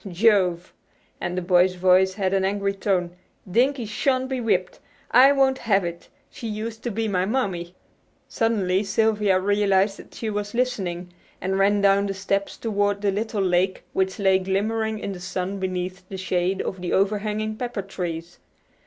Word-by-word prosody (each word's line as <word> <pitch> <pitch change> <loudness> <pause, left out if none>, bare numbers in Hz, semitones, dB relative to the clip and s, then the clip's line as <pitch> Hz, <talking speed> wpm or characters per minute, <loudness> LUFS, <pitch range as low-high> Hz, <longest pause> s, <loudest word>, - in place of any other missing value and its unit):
Jove!" 185 -3 +2 0.5
and 175 +1 -3
the 185 - -1
boy's 180 +1 +3
voice 185 +1 +4
had 195 -2 0
an 195 -1 +2
angry 200 +1 0
tone, 185 -3 -1 0.3
"Dinkie 245 +6 +1
shan't 260 +4 0
be 260 -2 -2
whipped! 185 -5 0 0.3
I 260 +3 +7
won't 270 -1 +2
have 195 -5 +2
it. 170 0 -7 0.2
She 230 - -7
used 220 +1 -5
to 240 - -3
be 225 +1 -2
my 185 -2 0
mammy." 185 -8 -2 0.5
Suddenly 200 -4 +1
Sylvia 210 -2 +2
realized 200 0 +2
that - - -14
she 220 -2 -3
was 205 +1 -4
listening, 185 -8 -2 0.3
and 190 +1 -1
ran 200 +1 +3
down 200 0 +4
the 195 - -3
steps 200 +1 -2
toward 205 -2 0
the 200 - +2
little 210 0 -2
lake 185 +1 +1
which 190 0 0
lay 190 -2 +3
glimmering 215 +4 -1
in 205 - -4
the 185 - -7
sun 185 +2 -4
beneath 185 0 -3
the 195 - -6
shade 185 0 -1
of 190 - -5
the 180 - -2
overhanging 210 +2 0
pepper 235 -3 -4
trees. 175 -3 -6
195 Hz, 170 wpm, -24 LUFS, 185-215 Hz, 0.5 s, I